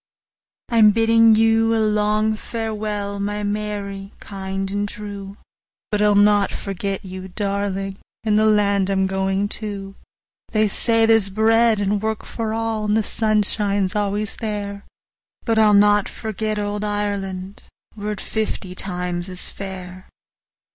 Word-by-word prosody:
I'm 225 Hz, -3 st, +6 dB
biddin' 225 Hz, +1 st, +5 dB
you 225 Hz, +1 st, +3 dB
a -, -, +2 dB
long 215 Hz, 0 st, +2 dB
farewell, 215 Hz, -3 st, -4 dB
My 205 Hz, +1 st, -2 dB
Mary—kind 200 Hz, -2 st, -4 dB
and 205 Hz, 0 st, -1 dB
true! 205 Hz, -2 st, -7 dB
50 -, -, -23 dB, 0.5 s
But 210 Hz, -1 st, +1 dB
I'll 210 Hz, -1 st, +4 dB
not 205 Hz, -1 st, +4 dB
forget 195 Hz, 0 st, -4 dB
you, 185 Hz, 0 st, -7 dB
darling! 195 Hz, 0 st, -3 dB, 0.2 s
In 215 Hz, -2 st, +2 dB
the 215 Hz, +1 st, +4 dB
land 200 Hz, -2 st, +3 dB
I'm 190 Hz, -1 st, +2 dB
goin' 190 Hz, +1 st, 0 dB
to; 200 Hz, -2 st, -5 dB, 0.6 s
They 215 Hz, -1 st, +3 dB
say 225 Hz, +2 st, +2 dB
there 225 Hz, 0 st, +6 dB
's 195 Hz, -2 st, -3 dB
bread 225 Hz, +2 st, +3 dB
and 205 Hz, 0 st, 0 dB
work 220 Hz, 0 st, -2 dB
for 225 Hz, -2 st, -4 dB
all, 225 Hz, -1 st, -1 dB
And 210 Hz, +1 st, +2 dB
the 220 Hz, -, +2 dB
sun 215 Hz, 0 st, +1 dB
shines 200 Hz, -2 st, 0 dB
always 205 Hz, 0 st, -1 dB
there— 205 Hz, -2 st, -4 dB, 0.6 s
But 225 Hz, -2 st, +2 dB
I'll 210 Hz, -1 st, +6 dB
not 205 Hz, 0 st, +4 dB
forget 215 Hz, -1 st, -3 dB
old 205 Hz, 0 st, -2 dB
Ireland, 200 Hz, -2 st, -3 dB, 0.3 s
55 205 Hz, -, -10 dB
Were 210 Hz, -, -1 dB
it 205 Hz, -, -8 dB
fifty 215 Hz, -4 st, -3 dB
times 180 Hz, -1 st, -3 dB
as 185 Hz, -1 st, 0 dB
fair! 185 Hz, -1 st, -8 dB
205 Hz, 150 wpm, -21 LUFS, 195-215 Hz, 0.6 s, I'm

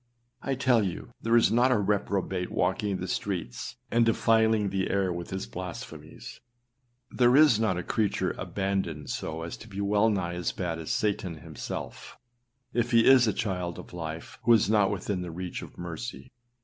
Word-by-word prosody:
â -, -, -5 dB
I 135 Hz, -, +2 dB
tell 130 Hz, -3 st, +3 dB
you 95 Hz, -3 st, -4 dB
there 115 Hz, +1 st, +2 dB
is 115 Hz, -, +4 dB
not 120 Hz, +3 st, +4 dB
a 125 Hz, -, +4 dB
reprobate 95 Hz, -2 st, -1 dB
walking 100 Hz, -2 st, 0 dB
the 95 Hz, -, -5 dB
streets 90 Hz, -8 st, -3 dB, 0.2 s
and 120 Hz, 0 st, +4 dB
defiling 110 Hz, -2 st, +3 dB
the 95 Hz, -1 st, -1 dB
air 95 Hz, -2 st, +1 dB
with 85 Hz, 0 st, -6 dB
his 95 Hz, 0 st, -4 dB
blasphemies, 90 Hz, -1 st, -8 dB, 0.7 s
there 125 Hz, 0 st, +4 dB
is 145 Hz, -7 st, +6 dB
not 105 Hz, -5 st, +1 dB
a 90 Hz, -, -3 dB
creature 105 Hz, +2 st, 0 dB
abandoned 95 Hz, -7 st, -3 dB
so 80 Hz, +1 st, -4 dB
as 85 Hz, -, -5 dB
to 115 Hz, -, -12 dB
be 100 Hz, -2 st, -7 dB
well 105 Hz, +2 st, +3 dB
nigh 90 Hz, -5 st, -1 dB
as 90 Hz, 0 st, -2 dB
bad 85 Hz, -3 st, -3 dB
as 80 Hz, -, -6 dB
Satan 100 Hz, -5 st, -1 dB
himself, 75 Hz, -, -7 dB, 0.6 s
if 120 Hz, -, +1 dB
he 115 Hz, -1 st, +5 dB
is 130 Hz, -3 st, +7 dB
a -, -, +3 dB
child 90 Hz, -5 st, -3 dB
of -, -, -11 dB
life, 80 Hz, -1 st, -6 dB
who 120 Hz, -, +5 dB
is 110 Hz, -, +4 dB
not 105 Hz, -3 st, +4 dB
within 100 Hz, -1 st, -2 dB
the 90 Hz, -, -5 dB
reach 90 Hz, +2 st, -5 dB
of -, -, -11 dB
mercy. 90 Hz, +9 st, -7 dB
100 Hz, 185 wpm, -28 LUFS, 90-115 Hz, 0.7 s, is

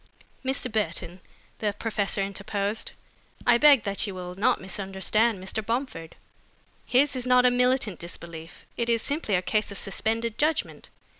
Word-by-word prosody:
"Mr. 260 Hz, -1 st, -1 dB
Burton," 180 Hz, -3 st, -2 dB, 0.4 s
the 210 Hz, -2 st, 0 dB
professor 205 Hz, -2 st, -1 dB
interposed, 200 Hz, +2 st, -2 dB, 0.5 s
"I 240 Hz, -1 st, +5 dB
beg 285 Hz, -5 st, +7 dB
that 200 Hz, +2 st, -2 dB
you 195 Hz, -, -5 dB
will 180 Hz, -1 st, -6 dB
not 195 Hz, +4 st, +2 dB
misunderstand 195 Hz, +3 st, 0 dB
Mr. 190 Hz, +4 st, -4 dB
Bomford. 230 Hz, -, -3 dB, 0.7 s
His 275 Hz, +3 st, +3 dB
is 255 Hz, -1 st, -3 dB
not 250 Hz, 0 st, +5 dB
a 250 Hz, -, +6 dB
militant 250 Hz, -5 st, +2 dB
disbelief, 170 Hz, -1 st, -9 dB
it 235 Hz, 0 st, -1 dB
is 230 Hz, -1 st, +2 dB
simply 285 Hz, -8 st, -1 dB
a 180 Hz, -, +1 dB
case 215 Hz, +2 st, 0 dB
of 200 Hz, -, -4 dB
suspended 225 Hz, +3 st, -1 dB
judgment. 310 Hz, +2 st, 0 dB
215 Hz, 150 wpm, -27 LUFS, 190-245 Hz, 0.7 s, beg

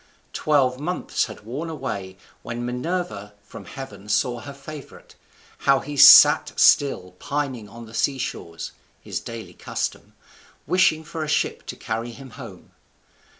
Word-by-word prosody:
Twelve 135 Hz, -4 st, +2 dB
months 175 Hz, +5 st, -1 dB
had 110 Hz, -, -10 dB
worn 140 Hz, +9 st, -5 dB
away, 100 Hz, -11 st, -5 dB, 0.2 s
when 120 Hz, 0 st, -5 dB
Minerva 125 Hz, -, -3 dB
from 100 Hz, -, -11 dB
heaven 105 Hz, -7 st, -9 dB
saw 120 Hz, +3 st, +1 dB
her 140 Hz, -, -8 dB
favourite, 140 Hz, +1 st, -11 dB, 0.5 s
how 135 Hz, -1 st, +3 dB
he 145 Hz, 0 st, -7 dB
sat -, -, +9 dB
still 95 Hz, -11 st, +4 dB
pining 140 Hz, -7 st, -3 dB
on 115 Hz, +2 st, -11 dB
the 110 Hz, -, -14 dB
seashores 125 Hz, -10 st, -3 dB, 0.3 s
(his -, -, -5 dB
daily 115 Hz, -1 st, -8 dB
custom), -, -, -5 dB, 0.5 s
wishing 160 Hz, -4 st, +3 dB
for 160 Hz, 0 st, -5 dB
a -, -, -4 dB
ship 150 Hz, -, -1 dB
to -, -, -5 dB
carry 115 Hz, +2 st, -4 dB
him 130 Hz, +2 st, -11 dB
home. 110 Hz, -8 st, -11 dB
130 Hz, 140 wpm, -23 LUFS, 110-145 Hz, 0.5 s, sat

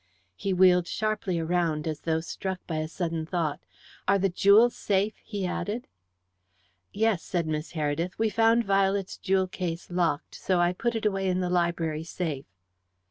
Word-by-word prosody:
He 195 Hz, -, -2 dB
wheeled 180 Hz, -1 st, +5 dB
sharply 215 Hz, -3 st, -1 dB
around, 165 Hz, -2 st, 0 dB
as 155 Hz, -2 st, -3 dB
though 160 Hz, -1 st, 0 dB
struck 190 Hz, +2 st, -5 dB
by 160 Hz, -, -3 dB
a 155 Hz, 0 st, -1 dB
sudden 165 Hz, -1 st, -3 dB
thought. 160 Hz, -3 st, -2 dB, 0.5 s
"Are 200 Hz, -, +5 dB
the 195 Hz, 0 st, +1 dB
jewels 205 Hz, +6 st, +5 dB
safe?" 200 Hz, +2 st, +1 dB
he 205 Hz, -3 st, -4 dB
added. 210 Hz, +6 st, -3 dB, 1.0 s
"Yes," 220 Hz, -4 st, +1 dB
said 175 Hz, -3 st, -2 dB
Miss 155 Hz, +1 st, -3 dB
Heredith. 160 Hz, +3 st, -2 dB
"We 220 Hz, -1 st, +1 dB
found 225 Hz, +2 st, +3 dB
Violet's 195 Hz, -1 st, +1 dB
jewel 190 Hz, 0 st, +2 dB
case 180 Hz, -2 st, -5 dB
locked, 170 Hz, -3 st, 0 dB
so 185 Hz, -2 st, 0 dB
I 175 Hz, 0 st, +3 dB
put 235 Hz, +5 st, -1 dB
it 225 Hz, -, -2 dB
away 195 Hz, -2 st, +1 dB
in 185 Hz, 0 st, +1 dB
the 180 Hz, -1 st, -1 dB
library 170 Hz, -3 st, 0 dB
safe." 160 Hz, -5 st, -4 dB
180 Hz, 165 wpm, -27 LUFS, 165-200 Hz, 1.0 s, wheeled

